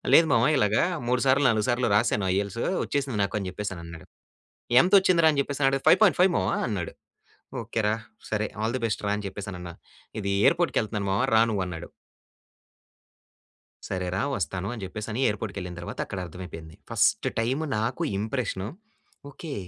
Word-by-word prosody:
"లేదు 160 -1 +6
మామ! 115 0 +4
ఇలాగా 105 -2 +3 0.3
మూడు 125 0 +2
సార్లు, 135 +2 +4
నాలుగు 110 0 +1
సార్లు 120 -1 +1
రాశాను 105 -2 +2
ఐఈ‌ఎల్‌టీయెస్ 100 - -1
వచ్చేసింది 135 -6 -2
నాకు" 100 +2 -1
అని 95 - -4
చెప్పేసనన్నాడు. 85 -5 -7 0.7
ఎంత 180 - 0
వచ్చిందిరా 170 -4 +4
అని 140 - -1
చెప్పేసి 140 0 -4
అడుగితే, 135 0 -2
"5.5" 190 -3 +5
మామ" - - 0 0.2
అన్నాడు. 95 -6 -3 0.7
"ఓకె 115 - -2
రా! 105 - +1 0.4
సరే, 105 0 0
ఆల్ 115 +3 0
దీ 125 - -8
బెస్ట్ 105 - -3
రా!" 100 - +1
అని 105 - -6
చెప్పేసనన్నా. 90 -3 -7 0.5
ఇది 100 0 -2
ఎయిర్‌పోర్ట్‌కకెళ్తన్నాను 110 - +1
మామ 100 - +1
రా - - +6
నువ్వు 100 -3 0
అన్నాడు. 85 -2 -7 2.0
"సరే 90 -1 -2
రా! 100 - 0
వస్తాను" 95 +2 -3
అని 110 -5 -7
చెప్పేసి 105 +3 -6
అని 110 - -3
ఎయిర్‌పోర్ట్‌కెళ్ళిన 100 -4 -5
తర్వాత 85 - -7
అక్కడ 95 - -5
అర్థమైపోయింది. 80 -2 -9 0.2
ఫస్ట్ - - +2
టైమ్ 125 +6 0 0.2
నాకు 115 +4 -2 0.2
ఇంప్రెషన్. 110 -3 -2 0.6
ఓకె. 145 +2 -7
105 Hz, 155 wpm, -26 LUFS, 95-125 Hz, 2.0 s, లేదు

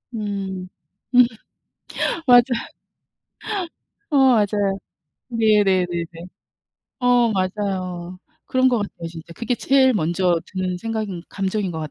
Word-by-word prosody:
음. 195 -3 -4 0.5
음 250 0 +8 1.0
맞아요. 245 -1 +8 1.7
어 295 - +2 0.2
맞아요. 205 -2 +1 0.5
네네네네. 195 -7 +2 0.9
어 245 -2 +3
맞아요. 185 -2 -3 0.3
그런 255 0 +3
것 245 -2 +2
같아요 175 -4 -7
진짜. 165 0 -10
그게 235 +5 -1
제일 265 +1 +4
먼저 175 -1 +1
드는 185 -1 -3
생각인 215 -4 -4
감정인 195 0 -2
것 160 -2 -5
같 155 -1 -5
195 Hz, 205 characters per minute, -22 LUFS, 180-225 Hz, 1.7 s, 음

